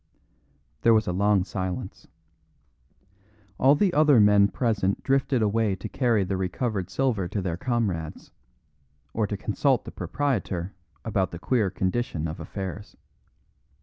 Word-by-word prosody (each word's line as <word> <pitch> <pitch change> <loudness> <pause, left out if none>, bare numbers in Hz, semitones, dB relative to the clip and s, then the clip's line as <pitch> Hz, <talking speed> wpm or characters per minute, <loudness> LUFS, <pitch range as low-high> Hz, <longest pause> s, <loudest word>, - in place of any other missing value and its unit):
There 115 -1 +5
was 110 -1 +2
a 90 - -1
long 100 0 +3
silence. 95 -2 -5 1.5
All 135 +3 +6
the 185 +3 +2
other 150 -4 +5
men 105 -1 +6
present 100 -2 -1
drifted 135 -3 +1
away 105 -1 +1
to 95 - -7
carry 120 -6 +1
the 95 +1 -2
recovered 95 +1 -2
silver 115 -7 0
to 100 - -3
their 90 -3 -2
comrades, 95 -7 -3 0.8
or 110 -2 0
to 100 - -3
consult 125 +6 0
the - - -7
proprietor 100 -10 -2 0.3
about 95 -5 0
the 85 - -7
queer 110 +2 +1
condition 95 -3 -2
of 80 - -6
affairs. 95 +1 -7
105 Hz, 135 wpm, -26 LUFS, 95-120 Hz, 1.5 s, All